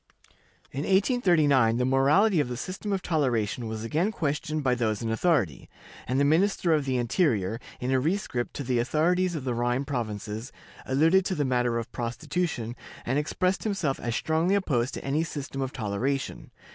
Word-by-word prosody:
In 135 Hz, -, -5 dB
1839, 160 Hz, -, +3 dB
the 125 Hz, -, +1 dB
morality 150 Hz, +10 st, +4 dB
of 145 Hz, -, +1 dB
the 125 Hz, -, -4 dB
system 185 Hz, -, -5 dB
of 195 Hz, -2 st, -1 dB
toleration 125 Hz, -, 0 dB
was 110 Hz, 0 st, -5 dB
again 160 Hz, -, 0 dB
questioned 155 Hz, -3 st, -2 dB
by 130 Hz, -2 st, +3 dB
those 115 Hz, -3 st, -1 dB
in 115 Hz, -, -1 dB
authority, 110 Hz, -, 0 dB, 0.4 s
and 130 Hz, +2 st, +1 dB
the 140 Hz, -, +4 dB
Minister 170 Hz, +2 st, +3 dB
of 150 Hz, -3 st, +1 dB
the 130 Hz, -2 st, 0 dB
Interior, 115 Hz, -, +1 dB, 0.2 s
in 125 Hz, +1 st, -2 dB
a 130 Hz, -, +3 dB
rescript 150 Hz, -5 st, -2 dB
to 140 Hz, -, -3 dB
the 125 Hz, -1 st, 0 dB
authorities 175 Hz, +8 st, +1 dB
of 150 Hz, -, -4 dB
the 125 Hz, -2 st, -1 dB
Rhine 120 Hz, +3 st, 0 dB
provinces, 110 Hz, -2 st, -4 dB, 0.4 s
alluded 160 Hz, +8 st, +4 dB
to 190 Hz, -, -1 dB
the 145 Hz, -, 0 dB
matter 125 Hz, -2 st, +1 dB
of 115 Hz, -, -5 dB
prostitution, 120 Hz, 0 st, -3 dB, 0.3 s
and 130 Hz, +4 st, +1 dB
expressed 180 Hz, +5 st, 0 dB
himself 190 Hz, -10 st, -1 dB
as 120 Hz, -1 st, -2 dB
strongly 160 Hz, +7 st, +1 dB
opposed 135 Hz, -11 st, 0 dB
to -, -, -7 dB
any 145 Hz, +4 st, +1 dB
system 140 Hz, -3 st, -5 dB
of 130 Hz, -1 st, -2 dB
toleration. 130 Hz, +5 st, -3 dB
135 Hz, 175 wpm, -27 LUFS, 120-165 Hz, 0.4 s, morality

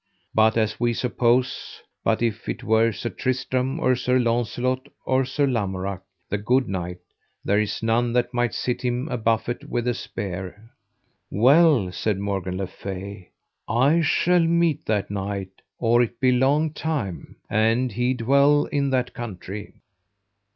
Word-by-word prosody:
But 110 Hz, +1 st, +4 dB
as 110 Hz, -1 st, 0 dB
we 120 Hz, 0 st, +1 dB
suppose, 125 Hz, +1 st, 0 dB, 0.2 s
but -, -, +1 dB
if 115 Hz, -3 st, -2 dB
it -, -, -4 dB
were 110 Hz, +1 st, +3 dB
Sir 110 Hz, +3 st, -5 dB
Tristram, 130 Hz, +2 st, -1 dB
or 130 Hz, -5 st, +3 dB
Sir 125 Hz, +1 st, +1 dB
Launcelot, 125 Hz, +2 st, 0 dB, 0.2 s
or 130 Hz, 0 st, +2 dB
Sir 140 Hz, +2 st, 0 dB
Lamorak, 100 Hz, -6 st, -2 dB, 0.3 s
the 105 Hz, -, -2 dB
good 125 Hz, +5 st, +2 dB
knight, 90 Hz, -2 st, -4 dB, 0.5 s
there 100 Hz, +1 st, +3 dB
is 105 Hz, +1 st, -2 dB
none 115 Hz, +1 st, +2 dB
that 125 Hz, 0 st, +1 dB
might 120 Hz, -2 st, 0 dB
sit 125 Hz, -, -2 dB
him 125 Hz, +2 st, -1 dB
a 125 Hz, -, -2 dB
buffet 115 Hz, +2 st, 0 dB
with 120 Hz, 0 st, -1 dB
a 120 Hz, -, +2 dB
spear. 100 Hz, 0 st, -6 dB, 0.6 s
Well, 130 Hz, -, +4 dB
said 105 Hz, +2 st, -1 dB
Morgan 95 Hz, -2 st, -3 dB
le 95 Hz, -, -2 dB
Fay, 95 Hz, 0 st, -8 dB, 0.4 s
I 135 Hz, +9 st, +3 dB
shall 175 Hz, +3 st, +3 dB
meet 170 Hz, -2 st, +1 dB
that 105 Hz, -2 st, 0 dB
knight 100 Hz, -1 st, -4 dB, 0.2 s
or 120 Hz, +1 st, +3 dB
it 120 Hz, 0 st, -2 dB
be 130 Hz, -1 st, +4 dB
long 145 Hz, +5 st, +2 dB
time, 140 Hz, -, -4 dB
an 115 Hz, +4 st, +2 dB
he 125 Hz, +3 st, 0 dB
dwell 140 Hz, +5 st, +4 dB
in 140 Hz, -1 st, +1 dB
that 130 Hz, -1 st, 0 dB
country. 105 Hz, -4 st, -7 dB
120 Hz, 150 wpm, -24 LUFS, 105-130 Hz, 0.6 s, But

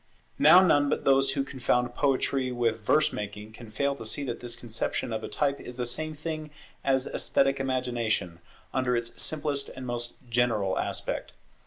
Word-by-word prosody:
Now 175 Hz, +5 st, +8 dB
none 145 Hz, -4 st, +4 dB
but -, -, -1 dB
those 135 Hz, 0 st, +4 dB
who 140 Hz, -, 0 dB
confound 125 Hz, -2 st, 0 dB
poetry 135 Hz, -1 st, +1 dB
with 115 Hz, -2 st, 0 dB
verse 150 Hz, +8 st, +3 dB
making 105 Hz, +1 st, -6 dB
can 115 Hz, 0 st, -11 dB
fail 140 Hz, +6 st, 0 dB
to -, -, -7 dB
see 110 Hz, +6 st, -3 dB
that 120 Hz, -4 st, -4 dB
this 120 Hz, -1 st, -3 dB
conception 115 Hz, 0 st, -3 dB
of 110 Hz, 0 st, -3 dB
a -, -, -3 dB
type 140 Hz, -1 st, 0 dB
is 125 Hz, -, -8 dB
the 125 Hz, 0 st, -2 dB
same 155 Hz, +6 st, -3 dB
thing 155 Hz, 0 st, -5 dB, 0.3 s
as 135 Hz, -1 st, +2 dB
esthetic 135 Hz, 0 st, +1 dB
imagination, 120 Hz, -9 st, -1 dB, 0.3 s
under 125 Hz, -2 st, +1 dB
its 120 Hz, 0 st, -3 dB
simplest 145 Hz, -2 st, -1 dB
and 130 Hz, 0 st, -8 dB
most 120 Hz, -1 st, -3 dB
general 115 Hz, -5 st, +1 dB
aspect. -, -, -3 dB
125 Hz, 175 wpm, -28 LUFS, 115-140 Hz, 0.3 s, Now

